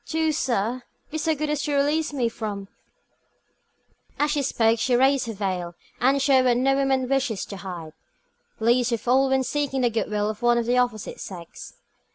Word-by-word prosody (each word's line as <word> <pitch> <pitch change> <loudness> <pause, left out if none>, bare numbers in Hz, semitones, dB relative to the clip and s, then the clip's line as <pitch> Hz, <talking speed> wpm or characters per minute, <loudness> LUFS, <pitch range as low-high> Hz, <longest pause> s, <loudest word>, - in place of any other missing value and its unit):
Do, 320 -1 +1
sir, 245 -4 -1 0.3
be 315 - -3
so 320 0 +1
good 300 +1 -2
as 300 -1 -1
to 295 -1 -1
release 295 +3 +1
me 260 -5 0
from 210 -3 -5 0.7
" - - -39
As 295 0 +2
she 295 -1 +1
spoke, 230 -4 +2
she 245 +2 +2
raised 265 0 +3
her 225 - -3
veil, 185 -4 -3 0.2
and 270 +3 +3
showed 270 -2 +4
what 245 -1 +3
no 270 +2 +3
woman 270 -2 +1
wishes 260 -6 0
to 200 - -8
hide, 175 -5 -7 0.7
least 240 +2 +2
of 230 0 -3
all 265 +2 +4
when 265 0 +2
seeking 270 0 -1
the 240 -1 +2
good 225 -1 -1
will 210 0 0
of 215 +2 -12
one 240 0 +3
of 235 - 0
the 245 +1 +2
opposite 240 -4 -2
sex. 175 -3 -9
250 Hz, 200 wpm, -24 LUFS, 220-275 Hz, 0.7 s, showed